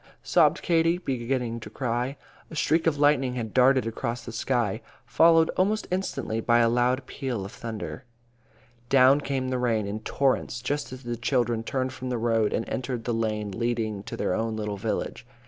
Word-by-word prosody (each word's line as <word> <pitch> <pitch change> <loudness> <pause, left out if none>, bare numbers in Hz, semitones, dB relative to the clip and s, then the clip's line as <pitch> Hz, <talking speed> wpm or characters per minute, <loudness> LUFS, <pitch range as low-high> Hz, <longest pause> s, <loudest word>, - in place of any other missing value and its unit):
sobbed - - +3
Katie, 165 0 +3
beginning 125 -6 -2
to 115 - -9
cry. 125 +2 -2 0.3
A - - -9
streak 160 +2 +2
of 155 -3 +2
lightning 140 -3 +3
had 115 -3 -4
darted 130 0 +4
across 115 +1 -3
the 115 - -6
sky, 115 -2 -1 0.2
followed 165 0 +5
almost 210 +4 0
instantly 180 -11 -2
by 120 +1 +3
a 115 -1 +4
loud 125 +2 +1
peal 125 -9 -4
of 100 - -8
thunder. 115 +2 -6 0.9
Down 135 +2 +6
came 135 -2 -2
the 130 -1 -1
rain 115 -4 +1
in 100 +2 -4
torrents, 130 0 0
just 145 +2 -2
as 130 0 -9
the 120 0 -4
children 120 -1 0
turned 130 +2 -2
from 130 -1 -6
the 125 - -1
road 115 -2 +1
and 115 - -2
entered 125 -2 -3
the 120 - -1
lane 105 -2 -1
leading 110 -1 -2
to - - -6
their - - 0
own 110 +2 -1
little 105 -1 -3
village. 100 - -3
125 Hz, 180 wpm, -26 LUFS, 115-135 Hz, 0.9 s, Down